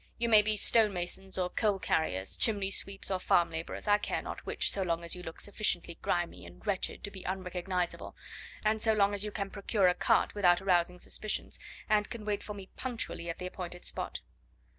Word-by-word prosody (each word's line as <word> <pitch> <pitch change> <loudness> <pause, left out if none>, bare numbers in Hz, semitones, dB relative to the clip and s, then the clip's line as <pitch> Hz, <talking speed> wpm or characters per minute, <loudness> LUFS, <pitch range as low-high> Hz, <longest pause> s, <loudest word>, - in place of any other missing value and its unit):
You 235 0 0
may 215 -2 +9
be 215 +1 +1
stonemasons 195 -4 +3
or 180 -1 0
coal 210 -3 +1
carriers, 95 - -1
chimney 200 -3 +1
sweeps 195 0 +1
or 190 - 0
farm 175 -2 +3
labourers, 165 +5 -5
I 205 0 +5
care - - -2
not - - -6
which - - +1
so 200 - -1
long 170 -2 -1
as 170 - -3
you 180 - -8
look 165 -2 -8
sufficiently 180 -5 -1
grimy 170 - -1
and 85 +1 -14
wretched 195 -2 -2
to 205 - -5
be 190 - -9
unrecognisable, 180 -1 -3 0.5
and 215 0 +2
so 220 0 +3
long 205 -1 +3
as 200 0 -1
you 210 - -2
can 195 -1 -4
procure 200 -1 +1
a 180 - +4
cart - - +2
without 180 -4 +4
arousing 180 -2 +2
suspicions, 215 +4 -4 0.3
and 210 -2 +2
can 225 -3 -7
wait 205 -1 -1
for 210 - -7
me 195 -2 -10
punctually 230 -9 -3
at 165 - -4
the 180 - -6
appointed 180 -1 -6
spot." - - -2
190 Hz, 205 wpm, -31 LUFS, 175-210 Hz, 0.5 s, may